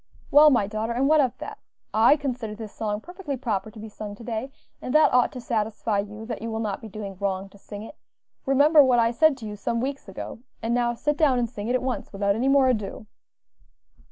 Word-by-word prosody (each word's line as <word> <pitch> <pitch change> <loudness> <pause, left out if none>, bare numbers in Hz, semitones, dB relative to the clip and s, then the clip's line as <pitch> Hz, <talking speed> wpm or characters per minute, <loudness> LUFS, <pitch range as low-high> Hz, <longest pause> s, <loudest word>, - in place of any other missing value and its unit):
"Well, 300 +2 +8
my 240 -8 +3
daughter, 215 +3 -3
and 260 +3 +1
what 310 0 +5
of 255 -4 -1
that? - - -8 0.3
I 225 +7 +5
consider 250 -6 -4
this 220 -1 -8
song 210 -1 -3
perfectly 350 - -6
proper 220 -5 -2
to 215 - -13
be 220 - -7
sung 210 -1 -8
to 230 - -12
day, 230 +2 -4 0.3
and 255 - -3
that 305 -2 +5
ought 250 -1 +4
to 255 - -6
satisfy 220 -2 -1
you 210 +2 -6
that 230 -2 -5
you 230 - -4
will 220 0 -3
not 210 -3 -3
be 225 - -8
doing 200 -2 -7
wrong 195 -1 -2
to 200 - -18
sing 205 +1 -9
it; 260 - -10 0.5
remember 290 +3 +6
what 255 -2 +3
I 230 0 +3
said 295 +3 +3
to 230 - -9
you 210 -1 -5
some 230 +3 -2
weeks 270 -3 -4
ago; 195 - -7 0.2
and 230 +1 -1
now 240 -1 +1
sit 295 +4 -1
down 285 -5 +3
and 240 -1 +1
sing 210 -2 -7
it 245 - +1
at 255 - 0
once, 260 -1 -3
without 200 0 +1
any 235 +6 0
more 275 -1 +5
ado." 215 -4 -2
230 Hz, 240 wpm, -25 LUFS, 210-265 Hz, 0.5 s, Well